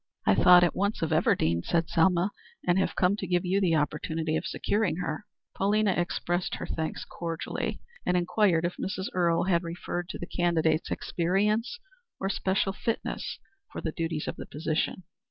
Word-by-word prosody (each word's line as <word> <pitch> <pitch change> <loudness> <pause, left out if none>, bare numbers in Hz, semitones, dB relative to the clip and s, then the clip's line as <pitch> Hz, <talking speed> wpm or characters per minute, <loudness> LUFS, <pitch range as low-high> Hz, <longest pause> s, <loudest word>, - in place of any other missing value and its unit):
"I 95 - +5
thought 180 - +7
at 175 - +2
once 200 -2 0
of 160 - -1
Everdean," 85 - +2
said 165 -1 +1
Selma, 180 +3 +3 0.3
"and 175 +1 +3
have 190 - 0
come 185 +2 +3
to 190 - -4
give 175 +1 +1
you 190 +3 +2
the 170 -4 +3
opportunity 155 +1 -1
of 175 - -1
securing 205 -5 0
her." 175 +2 -4 0.3
Pauline 210 +2 +2
expressed 175 0 -1
her - - -5
thanks 160 -1 -3
cordially, 165 -1 -4 0.2
and 180 - +2
inquired 175 -1 +2
if 175 - -3
Mrs. 190 0 -3
Earle 170 -2 +2
had 175 -2 +2
referred 175 +1 -4
to - - -5
the - - -5
candidate's 165 -3 +1
experience 210 - 0 0.4
or 195 - -1
special 190 0 0
fitness 230 +3 -3 0.3
for - - -5
the 160 - -3
duties 165 -1 -3
of - - -4
the - - -7
position. 155 +4 -2
175 Hz, 170 wpm, -28 LUFS, 165-190 Hz, 0.4 s, thought